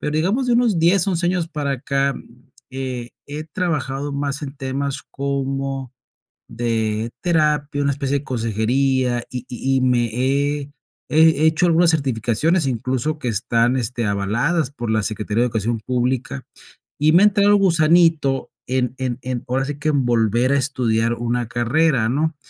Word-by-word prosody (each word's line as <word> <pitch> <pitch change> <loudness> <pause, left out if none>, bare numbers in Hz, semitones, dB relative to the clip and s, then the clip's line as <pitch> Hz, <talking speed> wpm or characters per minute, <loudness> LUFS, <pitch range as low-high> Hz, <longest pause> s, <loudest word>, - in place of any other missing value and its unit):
Pero 150 - -2
digamos 195 - 0
de - - +3
unos 235 -7 +2
10, 175 +3 +3
11 175 -2 0
años 175 -2 0
para 145 -3 -2
acá, 140 +1 0
mm, 125 +2 -15 0.2
he 130 -2 -5 0.2
he 150 +2 -5
trabajado 145 -4 -3
más 140 +1 -3
en 140 0 -6
temas 140 +1 -3
como 135 -1 -3 0.6
de 115 -1 -1
terapia, 150 -4 +1
una 140 - +1
especie 140 0 -1
de - - -15
consejería, 120 +2 0
y 125 -1 -5
y 135 +2 -1
y - - 0
me 125 -2 +2
he 140 +3 -1 0.4
he 160 0 +4
hecho 160 +2 +3
algunas 170 0 +4
certificaciones, 140 - 0
incluso, 130 +5 -2
que 140 - -7
están, 115 +3 +1
este, 120 -2 -2
avaladas 120 - 0
por 120 -5 -5
la 110 - +1
Secretaría 105 +1 -2
de - - +3
Educación 115 -1 -2
Pública, 125 - -2 0.5
y 155 +1 +3
me 175 +4 +6
ha - - +7
entrado 205 0 +3
el 205 - +6
gusanito 165 -6 +3 0.2
en 125 -1 -1
en 125 -2 -2
en 125 -2 -4
ahora 130 +2 0
sí 145 0 -5
que 155 +1 0
en 140 -3 +1
volver 120 +1 +2
a 140 - +3
estudiar 120 -4 0
una 120 +1 -2
carrera, 120 +1 +1
¿no? 155 +4 0
135 Hz, 165 wpm, -20 LUFS, 120-155 Hz, 0.6 s, ha